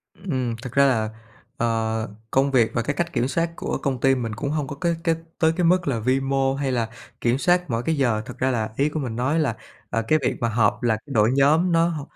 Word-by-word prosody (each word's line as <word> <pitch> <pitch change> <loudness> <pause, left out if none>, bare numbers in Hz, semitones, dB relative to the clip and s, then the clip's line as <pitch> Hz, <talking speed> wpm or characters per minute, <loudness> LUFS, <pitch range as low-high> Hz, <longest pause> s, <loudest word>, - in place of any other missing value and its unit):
Ừm, 130 -11 -2
thực 125 -2 -7
ra 140 0 +5
là, 110 -5 +2 0.5
ờ, 115 -1 0 0.2
công 135 +1 +2
việc 120 -4 +3
và 115 - 0
cái 140 +5 -2
cách 170 +2 -2
kiểm 125 - +1
soát 165 +5 0
của - - -3
công 135 -4 -2
ty 135 +1 +4
mình 115 -4 -3
cũng 140 +4 -3
hông 150 -2 -1
có 145 - -6
cái 170 -1 +1
cái 165 -2 +2 0.2
tới 160 0 +3
cái 180 - +1
mức 175 -1 +3
là 120 -5 0
vi 130 +4 +1
mô 135 0 +1
hay 140 -1 -1
là 115 -3 -1 0.3
kiểm 120 +2 +2
soát 180 +2 +2
mỗi 115 0 -1
cái 160 +3 0
giờ, 120 -6 +1
thật 125 0 -9
ra 130 +1 +1
là 110 -3 -1
ý 140 +2 +2
của 155 +1 -3
mình 120 -5 -4
nói 130 +7 +1
là, 135 -8 0 0.3
à, 115 - 0
cái 155 - +4
việc - - +1
mà 115 - 0
họp, 120 +2 +1
là 110 -2 +2
đội 115 -6 +2
nhóm 155 +6 +4
nó 165 0 +4
h 160 -3 -4
135 Hz, 255 wpm, -23 LUFS, 120-155 Hz, 0.5 s, ra